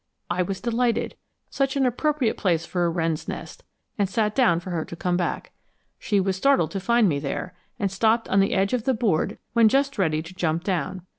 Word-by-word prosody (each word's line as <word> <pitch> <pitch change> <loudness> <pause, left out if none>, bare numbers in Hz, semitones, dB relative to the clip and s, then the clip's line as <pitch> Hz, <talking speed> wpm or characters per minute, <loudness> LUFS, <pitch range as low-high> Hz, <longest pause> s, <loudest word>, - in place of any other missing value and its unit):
I 180 - +1
was 190 +1 -2
delighted, 235 0 0 0.4
such 275 -1 0
an 275 -1 +2
appropriate 260 -1 0
place 170 -4 0
for 175 -1 -1
a - - +2
wren's 165 -2 -2
nest, - - -7 0.4
and 200 -2 +1
sat 210 0 0
down 220 -11 +3
for 180 +1 -8
her 165 -2 -1
to 170 - -9
come 175 +1 -1
back. 175 -1 -2 0.5
She 205 -2 +1
was 190 0 0
startled 190 - +2
to 195 - -3
find 235 +2 +3
me 145 -5 0
there, 155 +5 -4 0.2
and 200 -5 -1
stopped 225 +3 +2
on 195 - +2
the 195 - +2
edge 195 +3 +1
of 245 -3 -1
the 265 - +2
board 205 -4 0 0.2
when 230 -2 +5
just 275 -1 +1
ready 155 -4 +1
to 170 +3 -11
jump 170 -2 -1
down. 185 -1 -2
195 Hz, 215 wpm, -24 LUFS, 175-235 Hz, 0.5 s, when